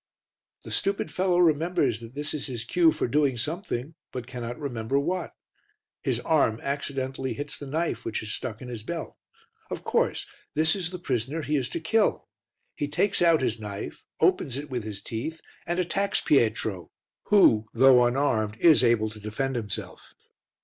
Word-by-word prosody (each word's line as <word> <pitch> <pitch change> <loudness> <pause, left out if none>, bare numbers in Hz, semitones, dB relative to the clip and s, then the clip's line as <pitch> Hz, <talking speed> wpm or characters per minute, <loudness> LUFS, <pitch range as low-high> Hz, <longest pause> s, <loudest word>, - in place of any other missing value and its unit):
The - - -9
stupid 195 -5 0
fellow 180 +2 +1
remembers 165 -7 +2
that 115 +2 -11
this 145 +1 -2
is 150 - -3
his 120 -4 -4
cue 165 +5 +4
for - - -1
doing 140 -1 +2
something, 155 - -3 0.2
but 125 -2 -5
cannot 120 -1 -6
remember 130 -1 -1
what. 175 +4 -2 0.7
His - - 0
arm 110 +1 +2
accidentally 135 -1 -2
hits 145 +1 -3
the 145 - -7
knife 160 +5 -1
which 115 -1 -3
is 105 - -4
stuck 115 -2 -5
in - - -8
his 120 -3 -5
belt; 165 +9 -5 0.5
of - - -5
course, - - +1 0.3
this 160 +3 +3
is 180 -4 -2
the 180 - -6
prisoner 140 0 -2
he 150 +2 0
is 130 -3 0
to - - -3
kill; 215 +7 +1 0.5
he 145 - -2
takes 175 +8 +1
out 165 -5 +5
his 115 -2 0
knife, 100 -2 -7
opens 130 -1 +2
it 145 0 -7
with 120 -3 -2
his 105 -2 -6
teeth 140 +9 -4 0.3
and 175 +1 0
attacks 195 +3 +1
Pietro 110 - +1 0.4
who, 115 - +5
though 130 -2 +6
unarmed, 120 -4 +1
is 155 +1 +6
able 115 -3 +3
to 105 - -11
defend 110 +6 -2
himself. 105 -4 -5
135 Hz, 170 wpm, -27 LUFS, 115-160 Hz, 0.7 s, though